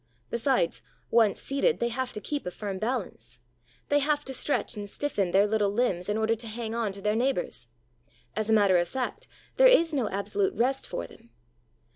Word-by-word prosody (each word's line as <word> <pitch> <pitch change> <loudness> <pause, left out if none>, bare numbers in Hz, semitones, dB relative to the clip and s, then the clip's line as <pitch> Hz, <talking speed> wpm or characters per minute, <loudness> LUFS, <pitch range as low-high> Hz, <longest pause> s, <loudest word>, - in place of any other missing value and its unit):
Besides, 235 -6 +1 0.3
once 225 -4 +4
seated, 280 - +1
they 235 - +1
have 250 +1 -3
to - - -4
keep 285 +3 -4
a - - 0
firm 195 +1 -5
balance; 190 - -4 0.5
they 290 - +4
have 295 +1 0
to 265 - -5
stretch 285 -1 -1
and 205 -1 -6
stiffen 205 -8 -1
their 195 +3 +4
little 210 -1 +1
limbs 200 -4 0
in 210 - +1
order 220 +1 +2
to 230 +1 -6
hang 225 0 -5
on 230 -3 -1
to 200 0 -9
their 210 0 +2
neighbors. 260 +4 0 0.7
As 215 0 -2
a - - +4
matter 200 -4 +5
of 175 0 +1
fact, 265 - -4 0.3
there - - +8
is 335 -10 +5
no 255 -7 0
absolute 385 - -1
rest 265 +3 0
for 85 - -4
them. 115 - -16
225 Hz, 195 wpm, -28 LUFS, 200-270 Hz, 0.7 s, there